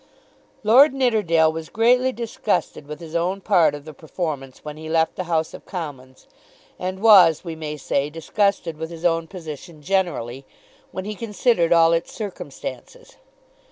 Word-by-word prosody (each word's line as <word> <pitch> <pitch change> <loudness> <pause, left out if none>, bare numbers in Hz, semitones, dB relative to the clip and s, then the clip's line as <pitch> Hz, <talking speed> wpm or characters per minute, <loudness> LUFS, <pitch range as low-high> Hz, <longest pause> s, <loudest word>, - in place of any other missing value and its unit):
Lord 260 +7 +6
Nidderdale 205 -12 +3
was 160 0 -7
greatly 250 +3 +3
disgusted 225 - -2
with 150 0 -7
his 165 -1 -9
own 180 +3 0
part 175 -7 +3
of 145 0 -10
the 155 - -9
performance 150 -4 -6
when 150 -1 -6
he 155 +1 -9
left 160 0 +1
the 185 - -4
House 160 -2 -1
of - - -12
Commons, 140 -8 -7 0.5
and 185 +1 -4
was, 190 -8 +7
we 165 -3 -6
may 150 -1 -5
say, 140 0 -1
disgusted 165 +1 -1
with 160 +1 -5
his 170 0 -8
own 165 -1 +1
position 160 -2 -9
generally, 145 -9 -1 0.5
when 185 - -5
he 210 - -4
considered 210 -4 +1
all 165 -1 +5
its 165 0 -1
circumstances. 230 - -8
170 Hz, 160 wpm, -22 LUFS, 155-200 Hz, 0.5 s, was